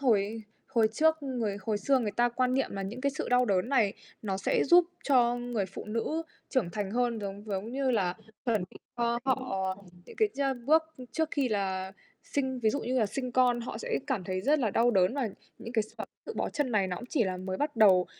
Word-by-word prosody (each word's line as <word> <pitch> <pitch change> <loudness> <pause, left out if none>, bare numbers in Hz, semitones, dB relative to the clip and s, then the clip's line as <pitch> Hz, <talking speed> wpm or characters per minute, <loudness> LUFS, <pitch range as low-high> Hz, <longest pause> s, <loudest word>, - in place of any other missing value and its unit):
hồi 235 -7 +4
y 220 +3 -5 0.4
hồi 225 -1 +5
trước 315 +3 +3
người 240 -7 -2
hồi 210 +1 -1
xưa 270 +6 +3
người 220 -4 -1
ta 240 +3 +2
quan 255 +1 +1
niệm 270 - +1
là 195 0 -3
những 215 +6 -5
cái 280 +1 +1
sự 270 - -4
đau 250 0 +4
đớn 195 -1 +1
này 235 -8 +3 0.3
nó 195 -3 -1
sẽ 195 - +1
giúp 350 +4 +7 0.2
cho 245 -4 +4
người 240 -5 -2
phụ 190 - -8
nữ 230 +9 -2 0.3
trưởng 235 -11 0
thành 200 +1 -3
hơn. 240 0 +1
Giống 200 +1 -6
giống 205 +3 -3
như 270 0 +1
là, 190 -7 +1 0.3
chuẩn 220 -6 +1 0.3
cho 235 0 +1
họ 195 -8 0 0.3
những - - -12
cái 435 -2 +3
cha 275 0 +1
bước, 290 +7 +3
ư, 255 - -9
trước 320 -1 0
khi 275 -3 +1
là 190 -3 -1 0.3
sinh 265 -2 -2
ví 220 - +3
dụ 280 - -1
như 255 +2 0
là 220 - +3
sinh 255 +4 -4
con, 245 -1 +3
họ 235 - -5
sẽ 485 -1 -1
cảm 230 -10 -1
thấy 185 0 -2
rất 295 +9 +3
là 230 -5 +1
đau 235 +4 +3
đớn 190 0 +3
và 270 -5 0 0.3
những 230 - -8
cái 225 -3 +2
x 215 - -11 0.4
tự - - -5
bó - - 0
chân 290 -4 -1
này 205 -4 +2
nó 180 - -3
cũng 240 - -8
chỉ 250 -7 +2
là 185 -1 -2
mới 185 +1 -4
bắt 290 +1 -2
đầu 190 -5 +6
235 Hz, 240 wpm, -30 LUFS, 200-260 Hz, 0.4 s, giúp